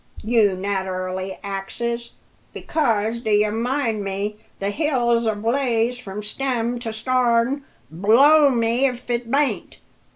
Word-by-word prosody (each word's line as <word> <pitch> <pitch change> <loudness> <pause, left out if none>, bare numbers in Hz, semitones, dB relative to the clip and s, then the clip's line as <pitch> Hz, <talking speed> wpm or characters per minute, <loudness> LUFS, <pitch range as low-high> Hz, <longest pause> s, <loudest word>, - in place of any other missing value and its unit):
you 215 -3 +3
naterally 190 -1 -3
axes. 235 +4 -4 0.4
Because, 230 -7 0
d'ye 210 -2 +2
mind 230 -1 -1
me, 200 +2 -3 0.2
the 200 +1 -2
hill's 240 -4 +1
ablaze 230 +2 0
from 210 -3 -7
stem 240 +1 -2
to 230 -2 -4
starn 245 +3 +1 0.3
blow 270 - +5
me 235 +1 +2
if 250 -1 -5
it 235 -1 -2
bain 280 +2 +1
t! - - -18
230 Hz, 120 wpm, -22 LUFS, 205-250 Hz, 0.4 s, blow